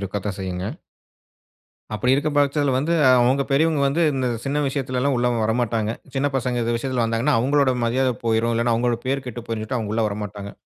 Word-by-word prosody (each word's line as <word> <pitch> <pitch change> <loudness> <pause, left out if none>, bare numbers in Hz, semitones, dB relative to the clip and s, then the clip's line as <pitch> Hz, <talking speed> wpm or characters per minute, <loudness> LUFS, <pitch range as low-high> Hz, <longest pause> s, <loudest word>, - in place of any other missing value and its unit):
இருக்கத்தான் 100 +1 -4
செய்யுங்க. 90 0 -4 1.3
அப்படி 125 +5 +1
இருக்க 145 +3 0
பட்சத்துல 145 -1 +2
வந்து, 150 +5 0 0.3
அவங்க 130 +3 +2
பெரியவங்க 155 +1 +2
வந்து 155 +5 +1
இந்த 130 -1 -1 0.2
சின்ன 140 +2 -1
விஷயத்துல 130 -2 -3
எல்லாம் 140 0 +1
உள்ள 120 0 +1 0.2
வரமாட்டாங்க. 110 -1 0 0.3
சின்ன 140 +2 +1
பசங்க 125 -2 -1
இந்த 115 +1 0
விஷயத்துல 125 0 -1
வந்தாங்கன்னா, 115 +5 +1
அவங்களோட 140 +1 +2
மரியாதை 125 +2 +1
போய்ரும், 115 +1 +1
இல்லனா 115 0 +1
அவங்களோட 120 0 0
பேரு 135 0 -1
கெட்டு 120 -1 -6
போய்ரும், 115 -1 -3
சொல்ட்டு 125 +3 -2
அவங்க 105 -2 -4
உள்ள 115 - +1
வரமாட்டாங்க. 100 -1 -6
125 Hz, 180 wpm, -22 LUFS, 115-135 Hz, 1.3 s, பட்சத்துல